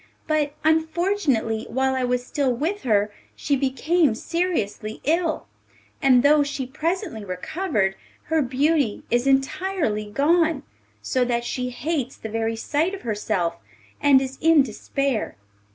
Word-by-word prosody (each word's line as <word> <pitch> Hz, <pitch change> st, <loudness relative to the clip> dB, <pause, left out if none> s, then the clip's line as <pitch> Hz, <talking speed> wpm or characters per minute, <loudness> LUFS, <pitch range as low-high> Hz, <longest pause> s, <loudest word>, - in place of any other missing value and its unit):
But, 300 Hz, -2 st, 0 dB
unfortunately, 320 Hz, -, +1 dB
while 265 Hz, +2 st, +1 dB
I 260 Hz, -1 st, -1 dB
was 250 Hz, 0 st, -1 dB
still 275 Hz, -1 st, 0 dB
with 320 Hz, -, -2 dB
her 210 Hz, -3 st, +1 dB, 0.2 s
she 285 Hz, -, 0 dB
became 275 Hz, +1 st, +2 dB
seriously 230 Hz, -, -2 dB
ill, 325 Hz, +1 st, 0 dB, 0.6 s
and 255 Hz, -2 st, +5 dB
though 295 Hz, +1 st, +6 dB
she 285 Hz, -2 st, -2 dB
presently 320 Hz, -, -3 dB
recovered, 195 Hz, -, -1 dB, 0.3 s
her 320 Hz, 0 st, +1 dB
beauty 275 Hz, -2 st, +1 dB
is 240 Hz, +3 st, +2 dB
entirely 270 Hz, -, 0 dB
gone, 315 Hz, +4 st, +2 dB, 0.4 s
so 255 Hz, -, +1 dB
that 235 Hz, -1 st, 0 dB
she 250 Hz, 0 st, -2 dB
hates 265 Hz, +1 st, -3 dB
the 220 Hz, -, -7 dB
very 225 Hz, +1 st, -1 dB
sight 310 Hz, -, 0 dB
of 385 Hz, -, -12 dB
herself, 205 Hz, -6 st, -1 dB, 0.4 s
and 285 Hz, -2 st, +6 dB
is 265 Hz, 0 st, -7 dB
in 320 Hz, -3 st, +6 dB
despair. 265 Hz, +1 st, -2 dB
270 Hz, 135 wpm, -23 LUFS, 230-320 Hz, 0.6 s, though